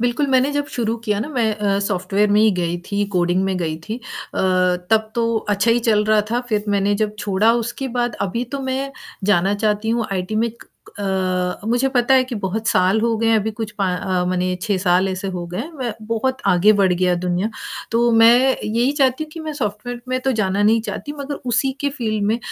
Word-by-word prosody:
बिल्कुल 245 +4 +1
मैंने 260 +2 +3
जब 290 0 -1
शुरू 230 -1 -2
किया 210 -3 0
ना, 235 - -3
मैं 240 -7 0
अ, 200 -1 0
सॉफ्टवेयर 200 +2 0
में 210 +1 +4
ही 220 - +5
गई 170 0 -1
थी, 205 0 +1
कोडिंग 175 +1 +2
में 190 -1 -1
गई 160 -2 -2
थी 220 - -2
अ, - - -12 0.9
तब 220 0 +2
तो 230 -1 +1 0.2
अच्छा 205 +3 +2
ही 235 - +4
चल 210 -1 +3
रहा 215 0 +4
था। 240 +1 +1
फिर 210 -3 0
मैंने 205 0 +2
जब 210 0 -6
छोड़ा 205 +2 +2
उसके 250 +3 -4
बाद 240 0 0
अभी 215 +6 -1
तो 280 - -2
मैं 270 +1 -3 0.3
जाना 195 -1 +3
चाहती 210 +1 +1
हूँ 230 -2 -1
आईटी 185 +2 -3
में 230 +1 +1
क 235 - -17
क - - -40 0.9
अ, - - -8
मुझे 245 +3 +2
पता 245 +2 +4
है 260 - +5
कि 255 -1 -6
बहुत 210 +4 -3
साल 185 +4 +3
हो 230 0 +1
गए 225 - 0
हैं, 225 - +4
अभी 215 +1 -2
कुछ 220 0 -5
पा 195 - +1
अ, 185 -1 -1
माने 180 0 0
6 205 -2 0
साल 185 +1 +2
ऐसे 190 +1 -3
हो 180 -2 -4
गए 175 +2 -6
हैं, 310 +8 -5
मैं 245 -3 -2
बहुत 245 +4 -1
आगे 195 +3 +5
बढ़ 195 -3 +3
गई 180 0 +2
दुनिया, 180 +3 0 0.4
तो 235 +1 +3
मैं 240 +4 +5
यही 235 +5 +1
चाहती 275 0 +1
हूँ 310 - -17
कि 330 - -7
मैं 315 -1 -5
सॉफ्टवेयर 240 -2 -4
में 255 0 0
तो 265 0 0
जाना 195 0 +1
नहीं 220 +2 +4
चाहती 290 - -5
मगर 280 +1 -4 0.2
उसी 265 +2 +2
के 285 - +1
फील्ड 215 -3 -1
में 220 +3 +1
220 Hz, 230 wpm, -20 LUFS, 195-245 Hz, 0.9 s, ही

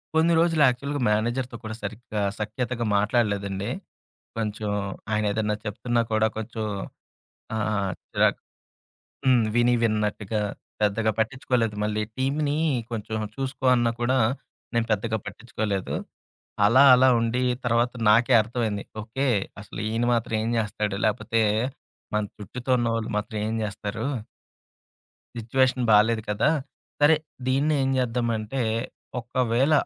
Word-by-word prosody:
కొన్ని 165 +1 +4
రోజులు 165 -2 +3
యాక్చువల్‌గా 140 +3 -1
మేనేజర్‌తో 120 +3 0
కూడా 110 0 -5
సరిగ్గా 105 0 -4 0.2
సఖ్యతగా 120 +2 -2
మాట్లాడలేదండి. 100 -2 0 0.7
కొంచెం 105 -1 -2 0.4
ఆయన 105 0 +1
ఏదైనా 105 0 0
చెప్తున్నా 120 +3 0
కూడా 110 0 +3
కొంచెం 110 0 -4 0.9
ఆహ్, 105 -3 0 0.2
చిరాకు - - +2 0.9
హ్మ్. 125 -3 +5
విని 120 0 +4
విన్నట్టుగా 105 -1 0 0.4
పెద్దగా 110 +2 +2
పట్టిచ్చుకోలేదు. 115 -1 0
మళ్ళీ 105 0 0
టీమ్‌ని 145 +3 0 0.3
కొంచెం 110 -1 -4 0.2
చూసుకో 135 -1 -3
అన్నా 120 -1 +2
కూడా, 130 +2 +2 0.6
నేను 115 -1 +2
పెద్దగా 110 +2 0
పట్టిచ్చుకోలేదు. 105 -2 -3 0.7
అలా 130 +6 +6
అలా 130 +1 +6
ఉండి 115 +2 0 0.2
తర్వాత 120 +1 +2 0.2
నాకే 120 +4 +5
అర్థమైంది. 110 -2 -2 0.2
ఓకే. 115 +6 -2 0.4
అసలు 105 - -9
ఈయన 115 +2 0
మాత్రం 115 -1 0
ఏం 115 - -1
జేస్తాడు? 105 -2 -1
లేపోతే 115 +1 +1 0.7
మన 105 - +2
చుట్టుతో 125 +5 -5
ఉన్నవాళ్ళు 115 -2 -1
మాత్రం 105 +1 -3
ఏం 110 - -2
జేస్తారు? 105 +1 -4 1.3
సిట్యుయేషన్ 125 +2 +1
బాలేదు 110 +1 +5
కదా! 105 +8 +2 0.5
సరే 150 +2 +7 0.3
దీన్ని 140 +4 +2
ఏం 135 - +1
చేద్దాం 120 -1 0
అంటే, 110 +5 -3 0.6
ఒకవేళ 125 +3 +1
115 Hz, 115 wpm, -25 LUFS, 105-125 Hz, 1.3 s, సరే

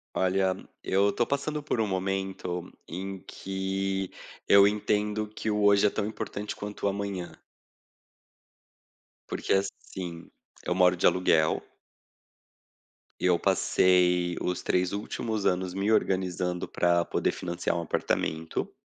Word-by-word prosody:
Olha, 95 0 +2 0.3
eu 100 +2 +2
tô 120 - +1
passando 150 +2 -2
por 145 - -2
momento 95 -2 -3 0.2
em 95 +2 -5
que 95 0 -2 0.4
eu 100 0 +8
entendo 105 +1 0
que 110 +1 -4
o 105 0 0
hoje 100 0 +5
é - - +3
tão 100 - -2
importante 105 -1 -5
quanto 105 0 -5
o - - +4
amanhã. 100 -3 -4 1.9
Porque, - - -2
assim, 95 -3 -3 0.4
eu - - 0
moro 90 0 +4
de - - +2
aluguel. 80 -4 +3 1.6
Eu 90 -1 +4
passei 90 0 +3
os 90 - -2
3 90 0 +1
últimos 105 +1 -3
anos 90 0 0
me 100 +2 0
organizando 90 -4 0
pra 85 -1 +2
poder - - 0
financiar 85 -1 -2
um 85 - -1
apartamento. 80 0 -2
95 Hz, 120 wpm, -28 LUFS, 90-100 Hz, 1.9 s, eu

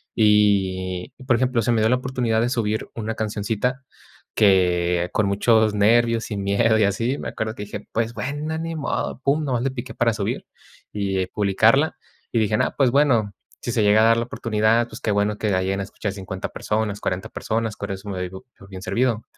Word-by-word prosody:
Y 95 -4 +2 0.2
por 130 - +4
ejemplo, 125 -1 +1
se 120 - +1
me 110 -2 +2
dio 110 - +3
la 125 - +4
oportunidad 125 -3 -1
de 120 +2 +1
subir 110 -3 -1
una 115 0 -4
cancioncita 110 +5 -2 0.5
que 90 -3 +3
con 105 - +2
muchos 110 +2 +3
nervios 115 +2 +3
y 105 - -2
miedo 100 +3 +2
y 110 - +4
así 115 +7 0
me - - -5
acuerdo 110 +1 -4
que 105 - -6
dije: 105 - -8
"Pues 115 +1 -1
bueno, 145 +5 -3
ni 165 0 -4
modo", 145 -3 -3
pum 140 +2 +2
nada 140 -4 -2
más 120 -1 0
le 135 - 0
piqué 120 -3 -7
para 115 -1 +1
subir 105 -2 -3 0.5
y 95 -2 -1
publicarla, 110 +10 +2 0.3
y 115 - +1
dije: 105 -1 +1
"Nah, - - +1
pues, 135 -4 +3
bueno, 120 -7 +3 0.3
si 120 - -3
se 110 - +1
llega 105 +1 +5
a 110 - +5
dar 115 0 +5
la 115 - +1
oportunidad, 115 0 +1
pues, 110 -1 -11
qué 105 - 0
bueno 105 +1 +1
que 105 - -1
la 95 -1 +2
lleguen 95 +1 -1
a - - -2
escuchar 100 +1 -5
50 95 -1 -6
personas, 105 -1 -2
40 90 +1 -3
personas, 110 -1 -2
con 100 0 -5
eso 95 +2 -6
me 95 - -4
doy 90 - -3
po 95 +1 -11
por 95 - -15
bien 95 -1 -8
servido". 115 +3 0
110 Hz, 215 wpm, -23 LUFS, 100-120 Hz, 0.5 s, llega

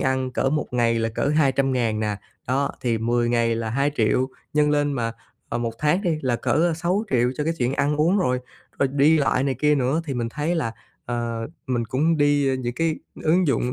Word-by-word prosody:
ăn 130 -1 0
cỡ 135 +1 0
một 150 0 0
ngày 115 -2 +2
là 115 0 0
cỡ 115 +5 -1
200.000 130 -6 +1
nè, 105 -1 -1 0.3
đó, 135 +3 +1
thì 115 -2 0
10 120 +1 +1
ngày 115 -1 +2
là 115 -1 -3
2.000.000, 130 -1 +1 0.3
nhân 150 0 +3
lên 145 -1 +1
mà, 115 -3 -2 0.4
ờ, 120 - -2
1 115 -1 -2
tháng 155 +6 +1
đi 170 -5 0
là 125 -3 +1
cỡ, - - -3
ơ, 165 +2 +2
6.000.000 170 - 0
cho 150 - -1
cái 165 - +1
chuyện 125 -1 +1
ăn 145 +2 +1
uống 170 +7 +3
rồi. 125 -9 +1 0.4
Rồi 140 - +2
đi 150 +3 +4
lại 135 -2 +2
này 135 -1 0
kia 150 +4 +2
nữa 135 +3 +1
thì 140 - -4
mình 120 -2 -2
thấy 150 +7 -2
là, 130 -9 -1 0.3
ờ, 115 -1 -3 0.2
mình 120 -3 0
cũng 150 +8 +1
đi, 145 -2 +3
ơ, 130 - +1
những 120 -2 -3
cái 165 +1 0 0.3
ứng 175 +3 +3
dụng 125 -2 +1
135 Hz, 220 wpm, -23 LUFS, 120-150 Hz, 0.4 s, đi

